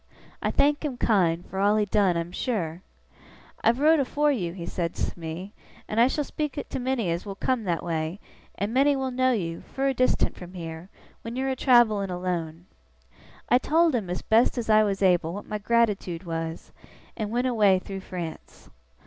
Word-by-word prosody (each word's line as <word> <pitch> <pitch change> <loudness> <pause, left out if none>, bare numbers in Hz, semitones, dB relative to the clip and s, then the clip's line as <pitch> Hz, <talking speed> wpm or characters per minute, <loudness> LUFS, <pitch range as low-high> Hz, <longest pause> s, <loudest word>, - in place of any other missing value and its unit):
I - - 0
thank 290 +2 +2
him 280 -5 -3
kind, 175 -7 +2
for 190 - -6
all 205 +2 +4
he 210 - +2
done, 195 -3 +2
I'm 170 +1 -3
sure! 180 -7 -2 0.8
"I've 235 +3 +3
wrote 310 +2 +5
afore 290 +2 +1
you," 180 -11 -2
he 170 -1 -7
says 170 -1 -3 0.2
to - - -17
me, 170 +5 -6 0.3
"and 215 - -1
I 235 - +7
shall 295 +3 -1
speak 300 0 -3
to - - -4
many 250 -7 -1
as 170 +1 -2
will 200 -2 -6
come 235 +2 -1
that 170 -3 -1
way, 165 +2 -2 0.4
and 200 +4 -3
many 280 +2 +4
will 265 -1 -2
know 255 +1 +2
you, 170 -8 -2
fur 270 0 -1
distant 255 0 +1
from 180 +1 -11
here, 165 +1 -7 0.3
when 230 +1 -6
you're 265 +1 -1
a - - -1
travelling 235 -7 +4
alone." 175 -2 -3 0.8
I 245 - +4
told 325 +3 +3
him, 215 -7 -1 0.2
best 225 +3 +4
as 225 -2 0
I 215 0 +6
was 200 -1 -1
able, 175 -2 +2
what 205 - -7
my 210 -1 -4
gratitoode 205 -6 +1
was, 165 -1 -5 0.4
and 215 -1 -3
went 245 +3 0
away 210 -6 +4
through 195 +1 -6
France. 175 -4 -8
205 Hz, 190 wpm, -26 LUFS, 175-250 Hz, 0.8 s, I